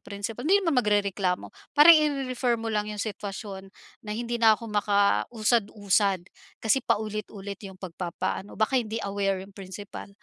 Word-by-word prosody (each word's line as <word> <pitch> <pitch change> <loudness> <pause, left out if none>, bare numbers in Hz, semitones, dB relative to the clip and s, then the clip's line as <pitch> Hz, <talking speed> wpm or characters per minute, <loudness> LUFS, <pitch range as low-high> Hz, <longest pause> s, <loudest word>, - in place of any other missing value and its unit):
principal. 205 +3 -6
Hindi 400 +1 +4
naman 290 -7 +3
magrereklamo, 200 -4 0 0.2
parang 315 +3 +10
ire-refer 265 -5 +1
mo 225 0 -4
lang 210 0 0
yung 210 - -5
sitwasyon 200 -2 -6 0.4
na, 210 - -6
"Hindi 235 0 -2
na 220 -1 +7
ako - - -10
makausad-usad, 205 -2 +2 0.4
kasi 245 +5 +3
paulit-ulit 205 -2 -3
'yung 190 - -11
pagpapaano," 185 +1 -5
baka 245 +4 +2
hindi 220 -1 -5
aware 195 -1 -1
'yung 200 - -16
principal. 195 +1 -9
210 Hz, 140 wpm, -27 LUFS, 195-230 Hz, 0.4 s, parang